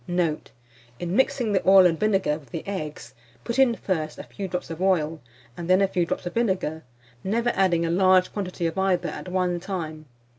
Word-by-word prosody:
Note. 175 -3 -1 0.5
In 175 +5 -3
mixing 245 -3 +1
the 190 -2 +2
oil 190 -1 +8
and 165 -2 +2
vinegar 195 -8 +1
with 140 -5 -20
the 160 - -6
eggs, 150 - -5 0.3
put 235 +2 -2
in 255 -3 +5
first 160 -8 -3
a - - -7
few 195 - -6
drops 180 -2 -4
of 165 +2 -6
oil, 165 -4 +1 0.3
and 175 0 -7
then 185 +1 +5
a 195 - +3
few 175 -3 0
drops - - -3
of 175 - -4
vinegar, 190 -9 -1 0.4
never 230 +5 +1
adding 175 -3 +2
a 165 - -1
large 185 +1 +4
quantity 185 -4 -3
of 165 +3 -1
either 180 -2 +1
at - - -7
one 180 -1 0
time. 160 -5 -5
180 Hz, 200 wpm, -25 LUFS, 165-195 Hz, 0.5 s, oil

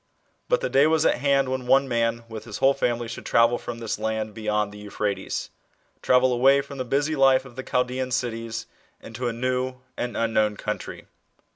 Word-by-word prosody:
But - - +2
the - - -1
day 140 +3 +5
was 160 0 +2
at - - +3
hand 140 -1 +2
when 130 -1 -3
one 135 +2 +4
man 115 -1 0
with 110 -1 -8
his - - -6
whole 135 +1 +4
family 120 -3 -1
should 115 - -7
travel 115 +1 +3
from 120 - -6
this 115 -2 -4
land 110 0 -2
beyond 105 -1 -1
the 105 - -11
Euphrates, 105 -1 -3 0.5
tmvel 125 0 +4
away 135 +3 +5
from 140 0 -10
the 130 - -2
busy 145 +5 0
life 135 -1 +4
of 125 -3 -13
the 130 - -4
Chaldean 125 0 -1
cities 115 -3 -3 0.3
into 120 +2 -5
a - - 0
new 130 +2 -1 0.2
and 120 0 -3
unknown 110 -2 +1
country. 105 0 -5
120 Hz, 190 wpm, -25 LUFS, 115-130 Hz, 0.5 s, day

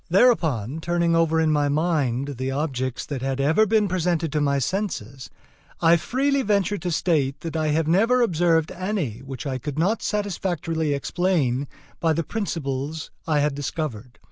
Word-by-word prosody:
Thereupon, 160 - +3
turning 170 0 +1
over 165 -1 +3
in 160 -1 +3
my 145 -1 +2
mind 145 -5 0
I 145 - -4
the 130 +1 -3
objects 135 -3 -2
that 140 -4 -5
had 135 0 -2
ever 160 +10 +3
been 215 0 +3
presented 175 -3 0
to 150 0 0
my 140 -1 +2
senses 135 - -3 0.5
I 165 +1 +5
freely 275 - +1
venture 205 -3 +1
to 180 - -3
state 155 -5 0
that 165 -1 -5
I 155 -1 0
have 155 +1 +1
never 225 +9 +4
observed 165 -5 +2
any 185 - -3
which 135 0 -8
I 130 -2 -2
could 145 +2 -5
not 195 +8 +1
satisfactorily 175 -7 -1
explain 145 -5 0 0.3
by 165 -1 +2
the 165 +2 -1
principles 155 -7 -3 0.2
had 150 -2 +2
discovered. 135 -4 -5
160 Hz, 165 wpm, -24 LUFS, 140-180 Hz, 0.5 s, I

